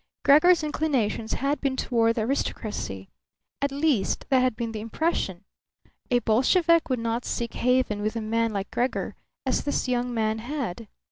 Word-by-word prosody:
Gregor's 320 +4 +6
inclinations 265 -8 -1
had 280 +2 -1
been 275 -2 0
toward 230 -3 +1
the 225 - 0
aristocracy; 215 - -3 0.5
at 280 0 0
least, 280 -8 0
that 265 - +5
had 255 -3 +2
been 230 -1 -3
the 220 - -5
impression. 220 - -2 0.7
A 245 - +4
Bolshevik 320 - +3
would 255 - +1
not 230 +1 -2
seek 235 -1 -3
haven 250 -4 +1
with 215 +2 -2
a 230 - -2
man 225 +1 0
like 200 -1 -4
Gregor, 250 +2 -1 0.3
as - - 0
this 285 - -1
young 245 0 0
man 220 -1 0
had. 235 -5 -4
240 Hz, 160 wpm, -26 LUFS, 220-275 Hz, 0.7 s, Gregor's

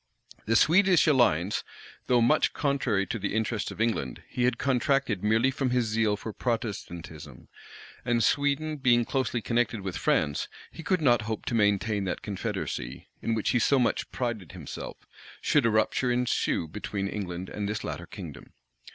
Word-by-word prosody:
The 115 - +2
Swedish 180 - +5
alliance, 105 - +3 0.4
though 125 -1 +4
much 150 +7 +3
contrary 135 -9 0
to 115 - -4
the 100 +1 -2
interests 110 -2 -1
of - - -9
England, 110 - -1
he 125 - -1
had 125 -1 +1
contracted 135 -5 +1
merely 110 +5 +3
from 135 -1 -1
his 125 -1 +2
zeal 110 -1 +1
for 110 +1 -6
Protestantism;[] 85 - -5 0.5
and 120 -1 +1
Sweden 145 +2 +1
being 120 -3 +3
closely 125 -4 -1
connected 115 -2 0
with 95 -2 -4
France, 75 -1 +1 0.2
he - - -9
could 180 +2 0
not 120 -5 +4
hope 110 - -3
to - - -2
maintain 105 -1 +2
that 95 - -3
confederacy, 70 - -4
in 115 - 0
which 110 - 0
he 125 - +3
so 140 +4 +3
much 125 -2 +1
prided 115 - -3
himself, - - -7 0.4
should 145 -6 +3
a - - +3
rupture 110 +3 +1
ensue 120 -8 0
between 100 +2 -4
England 95 -3 -4
and 100 -1 -4
this 105 0 -3
latter - - -5
kingdom. - - -10
115 Hz, 165 wpm, -28 LUFS, 100-125 Hz, 0.5 s, Swedish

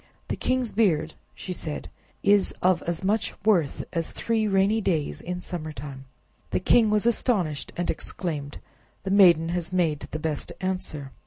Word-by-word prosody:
"The - - 0
king's 255 -3 -1
beard," 160 -8 +2 0.2
she 185 - -5
said, 155 -3 -4 0.4
"is 200 -1 +3
of 180 -1 +4
as 170 +2 -2
much 210 +3 0
worth 175 -10 +2
as 165 -1 -1
three 225 -2 0
rainy 200 +3 +3
days 160 -7 -1
in 180 0 -4
summer 155 -4 -5
time." 135 -1 -8 0.4
The - - 0
king 220 +4 +4
was 210 +1 +2
astonished 200 - +1
and 175 - -1
exclaimed, 150 -6 -3 0.5
"The 190 - -2
maiden 175 -5 +6
has 175 0 -2
made 165 -5 0
the - - -4
best 155 -1 -3
answer!" 180 -7 -3
180 Hz, 160 wpm, -26 LUFS, 155-200 Hz, 0.5 s, maiden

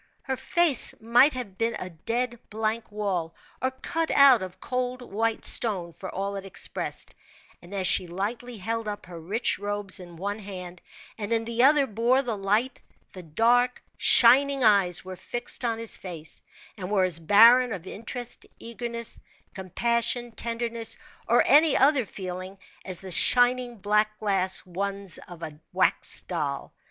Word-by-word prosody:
Her 265 - -2
face 290 +1 +1
might 240 +6 +4
have 220 -7 -7
been 230 0 0
a 185 - -7
dead, 235 +8 -3
blank 220 +1 -3
wall, 190 -6 -3 0.3
or 260 - +1
cut 320 +5 -3
out 275 -5 +7
of 185 -1 -8
cold, 250 0 -3
white 225 0 -2
stone, 185 -7 +2
for 185 +3 -8
all 200 +1 -4
it 195 - -6
expressed; 195 - -4 0.5
and 175 - -15
as 195 -2 -2
she 185 0 +4
lightly 220 +7 -5
held 225 +3 -4
up 205 -1 -6
her 175 -2 -10
rich 200 +8 -1
robes 205 -1 -2
in 175 -2 -12
one 205 +4 -4
hand, 180 -3 -9 0.4
and 205 +1 -5
in 225 0 +1
the 235 +1 -1
other 285 +2 +5
bore 240 +3 +1
the 235 -4 -3
light, 210 +6 -1 0.3
the 185 - -9
dark, 235 +9 +1
shining 270 +3 +5
eyes 195 -5 +3
were 185 0 -7
fixed 240 +7 -4
on 230 -2 -1
his 230 -1 -1
face, 165 -4 -6 0.4
and 185 -2 -6
were 200 -2 +2
as 180 -3 +2
barren 230 +8 +6
of 185 -4 -6
interest, 230 +4 -5
eagerness, 235 0 -5 0.3
compassion, 235 +5 -1
tenderness, 230 0 -3 0.3
or 235 - +4
any 300 +2 +6
other 270 -4 +3
feeling, 185 0 -7 0.3
as 185 -2 -7
the 190 -1 -9
shining, 245 +4 +4
black 210 +1 0
glass 190 -4 +1
ones 195 +1 -1
of 175 -2 -11
a 150 -2 -8
wax - - +1
doll. - - -4
215 Hz, 160 wpm, -26 LUFS, 190-240 Hz, 0.5 s, out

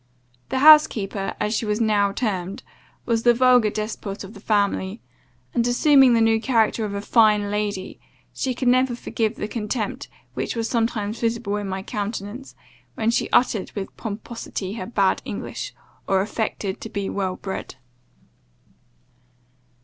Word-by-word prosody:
The - - -1
house 305 +2 +9
keeper, 195 -2 -4
as 210 +1 0
she 220 0 -1
was 210 +1 0
now 210 -3 +2
termed, 195 -4 -3 0.4
was 230 -1 +1
the 240 0 +4
vulgar 250 -3 +5
despot 210 -1 -5
of 195 +2 -10
the 200 - -12
family; 200 -1 0 0.5
and 235 0 +1
assuming 265 0 +5
the 230 - +3
new 225 0 +3
character 225 -2 +2
of 200 -1 -4
a 200 - -3
fine 210 -2 +3
lady, 205 -2 -3 0.3
she 255 -2 -2
could 255 - -2
never 255 0 +3
forgive 225 -1 -2
the 210 - -4
contempt 215 0 -3 0.2
which - - -3
was 230 -1 -1
sometimes 225 -2 -1
visible 230 -3 -1
in 205 -1 -4
my 190 0 -4
countenance, 210 +3 -5 0.4
when 225 +1 +1
she - - 0
uttered 230 -5 +2
with 200 -2 -5
pomposity 215 -3 -5
her 185 -5 -5
bad 200 -5 +1
English, - - -5 0.4
or 190 -1 +3
affected 205 -2 -3
to 225 - -6
be 200 -2 -3
well 190 -2 -2
bred. 190 -9 -6
215 Hz, 155 wpm, -23 LUFS, 200-235 Hz, 0.5 s, house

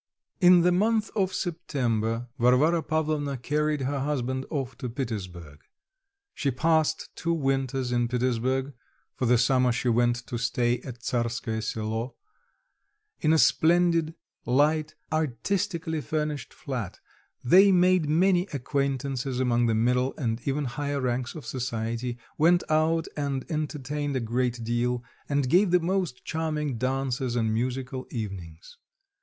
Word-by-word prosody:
In 180 -1 +7
the 180 +1 +4
month 215 +4 +1
of 190 -3 +1
September, 120 - -2
Varvara 135 +8 +4
Pavlovna 155 -3 -1
carried 150 +3 0
her 140 +2 -1
husband 130 -2 -2
off 135 -4 -3
to 125 - -4
Petersburg. 90 - -6 0.7
She 140 - -1
passed 155 +3 +1
two 170 0 -1
winters 135 -3 -1
in 120 -1 +1
Petersburg 130 +2 0 0.4
(for 125 - -1
the 125 +1 +5
summer 125 +1 +3
she 120 +1 0
went 120 +1 +3
to 120 - -4
stay 120 0 +1
at 125 -3 -9
Tsarskoe 115 -2 -1
Selo), 110 +2 -3 1.0
in 155 - +2
a 160 - +5
splendid, 165 0 +3 0.3
light, 150 +4 +2 0.2
artistically 160 - -1
furnished 150 -5 -3
flat; 120 -9 -5 0.4
they 190 +10 +7
made 180 -3 +3
many 180 +3 +3
acquaintances 135 -1 -2
among 120 -2 +2
the 115 - +2
middle 125 +3 +1
and 115 -4 -2
even 140 +1 0
higher 145 +2 -2
ranks 125 +1 -2
of 155 - -8
society; 120 -1 -3 0.2
went 175 +3 +4
out 160 +1 +2
and 140 -3 -2
entertained 150 -2 -3
a - - +1
great 120 0 -1
deal, 120 +1 -1 0.3
and 140 -2 +1
gave 180 +8 +4
the 180 +1 +4
most 175 -6 -2
charming 150 -5 -2
dances 130 -1 -1
and 110 -2 +1
musical 130 +2 -3
evenings. 95 -8 -7
135 Hz, 135 wpm, -27 LUFS, 120-155 Hz, 1.0 s, In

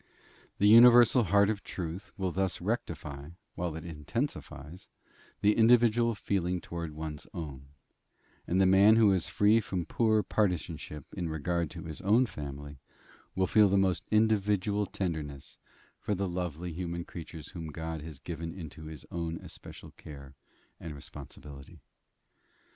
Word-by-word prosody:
The 100 - +2
universal 120 +1 +8
heart 100 +2 +4
of 105 -2 -5
truth 90 +2 -6
will 95 -2 -1
thus 95 +1 -1
rectify, 70 0 -4 0.2
while 85 -3 -3
it 80 +2 -7
intensifies, 85 - -5 0.5
the 105 +1 +4
individual 115 0 +4
feeling 90 -3 -1
towards 85 -2 -6
one's 75 -1 -6
own; 70 -5 -7 0.8
and 90 - +1
the 95 - +5
man 100 +3 +6
who 110 -3 +5
is 95 -4 +1
most - - -9
free 105 +2 +4
from 95 -5 -3
poor 110 +4 +2
partisanship 85 -7 -2
in 85 -2 -3
regard 85 +1 -1
to 85 -1 -9
his 80 -2 -7
own 110 +6 +4
family, 70 - -8 0.6
will 95 - +2
feel 105 +2 +5
the 100 +1 +2
most 95 -2 +1
individual 105 -2 +2
tenderness 75 -7 -5 0.4
for 105 - -2
the 100 +1 -1
lovely 90 -1 -4
human 85 0 -4
creatures 80 -2 -9
whom 85 -2 -7
God 80 0 -5
has 80 -2 -9
given 85 +3 -6
into 80 -3 -9
his 80 -3 -9
own 85 -1 -3
especial - - -11
care 70 -2 -12 0.5
and 80 -3 -7
responsibility. 70 0 -11
90 Hz, 145 wpm, -30 LUFS, 80-100 Hz, 0.8 s, universal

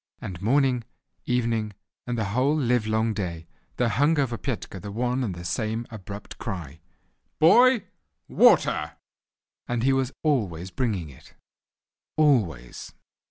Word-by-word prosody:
And 90 -2 -7
morning, 125 +2 +2 0.4
evening, 115 -4 0 0.3
and 120 -1 -2
the 110 - 0
whole 135 +5 +2
livelong 110 -3 +1
day, 85 -5 -4 0.3
there 125 - +2
hung 145 +8 +2
over 130 -4 0
Petka 115 -6 -5
the 105 - -7
one 125 +4 -1
and 100 -7 -3
the 85 0 -8
same 110 +6 -2
abrupt 100 -1 -9
cry, 80 - -6 0.6
"Boy, 240 +9 +6 0.4
water!" - - +4 0.7
and 120 -1 -1
he 135 +1 +4
was 135 -1 0
always 95 - 0
bringing 95 - -2
it—always. 90 - -3
115 Hz, 120 wpm, -25 LUFS, 95-130 Hz, 0.7 s, Boy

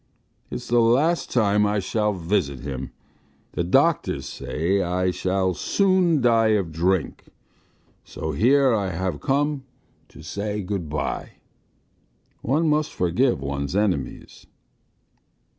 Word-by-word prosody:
It's - - -6
the 120 0 +3
last 140 +9 +2
time 105 -3 +3
I 105 +1 0
shall 105 +2 0
visit 85 -8 -1
him.... 65 -1 -5 0.6
The - - -2
doctors 135 - +2
say 95 +6 -1
I 90 +1 0
shall 95 0 0
soon 185 - +2
die 115 -3 +4
of 90 -5 -3
drink, 90 +2 -1 0.8
so 80 - -5
here 130 - +4
I 100 -3 0
have 90 -3 -3
come 145 0 0 0.4
to - - -14
say 105 0 -4
good 90 -4 -4
bye. 75 +1 -3 1.1
One 155 +7 +1
must 150 0 +1
forgive 90 - +1
one's 70 +4 -3
enemies." 95 -10 -2
100 Hz, 120 wpm, -23 LUFS, 85-125 Hz, 1.1 s, die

